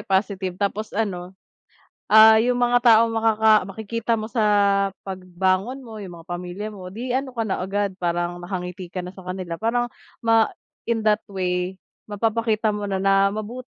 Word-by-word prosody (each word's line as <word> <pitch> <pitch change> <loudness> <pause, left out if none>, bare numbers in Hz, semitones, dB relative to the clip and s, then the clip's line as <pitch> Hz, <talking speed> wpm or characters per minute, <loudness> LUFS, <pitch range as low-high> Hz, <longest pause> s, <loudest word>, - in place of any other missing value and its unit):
positive. 190 -3 -1
Tapos 205 +2 -3
ano, 190 -4 -3 0.7
ah, 220 +1 +8
yung 245 +2 +1
mga 245 0 +3
taong 230 -1 +5
makaka 220 -1 +3 0.2
makikita 220 +3 -3
mo 215 - -4
sa 220 0 -1 0.6
pagbangon 190 +6 -2
mo, 220 -2 -9
yung 185 -4 -8
mga 165 0 -14
pamilya 180 +4 -5
mo, 185 -3 -9
'di 235 +7 -5
ano 260 0 -2
ka 225 - 0
na 200 - -2
agad, 200 +2 -1
parang 175 0 -1
nakangiti 180 0 -5
ka 180 +1 -5
na 180 - -8
sa 190 - -12
kanila 180 -2 -6
para 235 +2 +1 0.4
ma 225 -1 +4 0.4
in 225 -2 0
that 215 0 +3
way 180 -1 -2 0.3
mapapakita 220 +1 0
mo 205 -1 -4
na 195 - -1
na 195 +1 +3
mabu 215 +4 -5
205 Hz, 165 wpm, -23 LUFS, 185-225 Hz, 0.7 s, ah